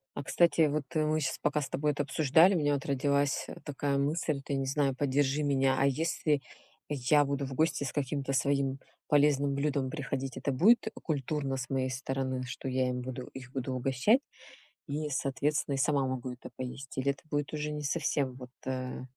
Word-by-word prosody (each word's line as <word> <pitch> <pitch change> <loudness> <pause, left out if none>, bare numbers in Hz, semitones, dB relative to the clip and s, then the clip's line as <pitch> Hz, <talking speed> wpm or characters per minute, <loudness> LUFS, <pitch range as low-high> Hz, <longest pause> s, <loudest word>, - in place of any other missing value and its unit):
А - - -4
кстати, 165 +1 +4
вот 150 0 -1
мы 155 0 +2
щас 130 -2 -1
пока 150 0 +1
с 140 - -4
тобой 150 +1 +1
это 145 0 -1
обсуждали, 155 +6 +5
у - - +3
меня 145 -2 +2
вот 140 -2 -2
родилась 140 0 +1 0.2
такая 140 -1 -1
мысль, 145 0 0
ты, 140 +1 -3
не 135 0 -1
знаю, 140 0 +1
поддержи 140 +1 +1
меня, 135 -2 +2
а 135 - +4
если 150 +1 +1 0.5
я 145 +1 +3
буду 140 0 -1
в 135 - -6
гости 155 0 +1
с 135 - -4
каким-то 140 -1 -2
своим 140 0 +1 0.3
полезным 145 -1 +3
блюдом 140 -2 0
приходить, 135 -2 -4
это 140 - -1
будет 210 - +5 0.2
культурно 140 -2 -1
с 130 -1 -5
моей 130 -1 0
стороны, 130 0 -2
что 130 +1 -6
я 130 0 +1
им 125 0 -2
буду 125 0 -6
их 130 -1 -9
буду 130 0 -2
угощать, 130 - +3 0.7
и 150 +1 -2
соответственно, 140 +1 0
и - - -1
сама 140 0 +2
могу 130 -1 -3
это 125 - -10
поесть, 130 +1 -7
или 135 +1 +2
это 140 - -6
будет 145 -2 -2
уже 150 0 -2
не 150 0 -4
совсем 140 -3 0
вот, 125 -1 -10 0.2
э? 130 -1 -3
140 Hz, 190 wpm, -30 LUFS, 130-150 Hz, 0.7 s, обсуждали